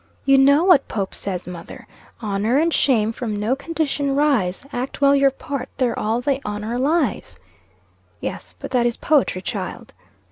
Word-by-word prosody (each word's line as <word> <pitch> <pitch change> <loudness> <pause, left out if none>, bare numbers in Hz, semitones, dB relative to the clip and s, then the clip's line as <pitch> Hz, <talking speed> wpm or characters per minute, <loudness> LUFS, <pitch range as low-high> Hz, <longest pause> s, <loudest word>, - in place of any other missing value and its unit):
"You 275 0 +5
know 280 +4 +5
what 355 -7 +5
Pope 195 -3 -3
says, 185 -2 -3
mother 175 -2 -9 0.4
'Honor 210 +4 0
and 330 +2 +2
shame 225 -5 +2
from 225 -2 -4
no 220 +5 +1
condition 285 -2 -2
rise; 270 -9 +1
Act 250 +2 -4
well 280 0 +5
your 275 0 +5
part, 270 0 -6
there 250 -3 0
all 225 +3 0
the 275 +1 0
honor 210 +3 -3
lies.'" 310 +6 0 0.8
"Yes, - - -6
but - - -8
that 245 -2 +3
is 235 - -2
poetry, 270 -11 +1
child." - - -5
260 Hz, 165 wpm, -21 LUFS, 215-280 Hz, 0.8 s, You